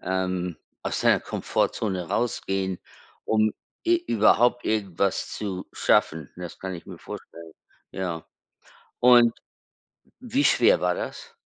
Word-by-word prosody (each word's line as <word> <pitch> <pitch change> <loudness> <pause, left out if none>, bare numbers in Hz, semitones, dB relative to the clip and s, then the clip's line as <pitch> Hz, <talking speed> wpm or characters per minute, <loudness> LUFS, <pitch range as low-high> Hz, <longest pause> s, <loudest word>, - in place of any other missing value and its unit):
ähm, 90 -2 -2 0.3
aus - - -2
deiner - - +4
Komfortzone 95 -5 -1
rausgehen, 95 -5 -1 0.5
um 110 -1 +2 0.3
e 350 +1 +4
überhaupt 120 +1 +3
irgendwas 100 -3 -1
zu 95 -3 -4
schaffen. 80 -2 +1
Das 90 -1 -8
kann 95 0 -4
ich 85 - -13
mir - - -9
vorstellen, 85 -1 -10 0.4
ja. 85 -4 -4 0.8
Und 120 -1 +7 0.9
wie 255 +3 0
schwer - - +4
war - - +1
das? 470 -1 -7
95 Hz, 115 wpm, -25 LUFS, 90-120 Hz, 0.9 s, Und